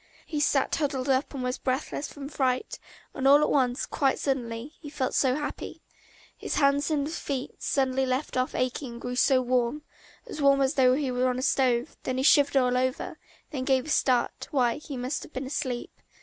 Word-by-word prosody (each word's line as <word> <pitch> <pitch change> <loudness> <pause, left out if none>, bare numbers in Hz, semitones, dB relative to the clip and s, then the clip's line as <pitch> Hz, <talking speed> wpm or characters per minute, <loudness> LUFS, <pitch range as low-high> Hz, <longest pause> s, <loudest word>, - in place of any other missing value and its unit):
He 305 - -3
sat 285 -2 +2
huddled 275 -3 -1
up 270 +1 +1
and 270 -3 -5
was 250 0 -2
breathless 275 +2 -2
from 280 -1 -8
fright, 260 -3 -1 0.3
and 270 0 0
all 285 +1 +8
at - - +1
once, 255 -2 +1
quite 270 -2 +1
suddenly, 250 0 -3
he 295 - -8
felt 275 -3 -2
so 260 -2 +2
happy: 295 0 -5 0.5
his - - -4
hands 280 +1 +2
and 290 -2 0
feet 280 -4 -5
suddenly 265 -1 +1
left 255 +3 -2
off 255 0 0
aching 255 0 -2
and 235 - -10
grew 245 0 -4
so 255 +1 +3
warm, 250 +3 0 0.4
as 370 -10 -7
warm 275 -1 +5
as 265 +1 +2
though 255 -3 +4
he 275 -2 -1
were 250 +1 +1
on 250 - -1
a 255 - -3
stove; 250 -3 +1
then 255 - -3
he 260 - 0
shivered 285 -1 +5
all 250 -1 +3
over, 255 +1 -2 0.3
then 290 - -4
he - - -2
gave 260 -2 +2
a - - -7
start, 255 -4 +1
why, 245 -4 +1
he 290 -3 -7
must 250 +3 -3
have - - -12
been 260 +1 -4
asleep. 260 -3 -3
265 Hz, 205 wpm, -27 LUFS, 255-285 Hz, 0.5 s, all